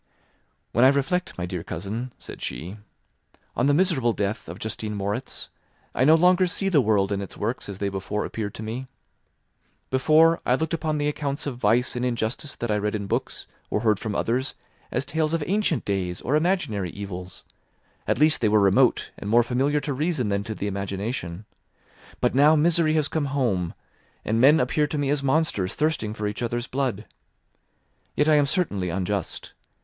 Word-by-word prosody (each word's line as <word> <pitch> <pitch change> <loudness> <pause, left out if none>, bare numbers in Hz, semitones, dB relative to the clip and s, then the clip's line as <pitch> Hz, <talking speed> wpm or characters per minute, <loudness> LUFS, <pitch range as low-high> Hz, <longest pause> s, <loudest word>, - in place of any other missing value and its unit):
"When 120 - +3
I - - +9
reflect, 140 +6 0
my 90 - -2
dear 90 -1 -4
cousin," 110 +9 -5
said - - -10
she, 85 - -5 0.8
"on 130 - +2
the 145 - +4
miserable 150 - +2
death 100 -4 -3
of 85 - -7
Justine 110 0 -4
Moritz, 100 +1 -4 0.4
I 130 - +2
no 155 +3 +7
longer 180 +2 +4
see 195 +2 -1
the 155 -7 +4
world 105 -4 +2
and 100 0 -1
its 100 - -8
works 115 +1 -3
as 100 - -6
they 100 - -1
before 100 +2 -3
appeared 105 -2 -4
to 110 - -6
me. 120 +4 -5 1.0
Before, 155 +5 +4
I 125 - +3
looked 160 +4 -2
upon 155 -2 -1
the 145 0 0
accounts 145 -1 -2
of 130 -4 -4
vice 125 +1 +2
and 125 - -2
injustice 120 +3 -2
that 120 -2 -3
I 105 - +1
read 105 +1 -1
in 100 -1 -3
books - - -2 0.2
or 105 - 0
heard 110 -3 +2
from 110 -3 -4
others 130 +4 -1 0.4
as 130 +3 -1
tales 155 +3 0
of 165 - -1
ancient 195 - +1
days 95 -3 -2
or 135 - 0
imaginary 155 - 0
evils; 90 -1 -7 0.6
at - - +1
least 155 +3 +4
they 110 - +3
were 105 0 +4
remote 100 -1 +3
and 100 - -5
more 120 +2 +5
familiar 135 +5 +1
to 145 - -2
reason 145 -5 0
than 100 0 0
to 110 -2 -4
the 100 - -4
imagination; 100 -1 -4 0.7
but 125 - +1
now 145 +4 +6
misery 160 0 +3
has 155 -2 +2
come 155 -1 -1
home, 120 -11 -1 0.5
and 115 +2 +1
men 145 +5 +7
appear 150 +4 +1
to 150 - -3
me 140 -1 0
as 145 -1 +1
monsters 140 - 0
thirsting 150 -9 -1
for 105 - -4
each 105 +2 -3
other's 120 0 -2
blood. 125 -6 -2 1.1
Yet 150 - +2
I 155 - +5
am 145 -1 +4
certainly 120 - 0
unjust. 95 +3 -3
120 Hz, 190 wpm, -25 LUFS, 100-150 Hz, 1.1 s, I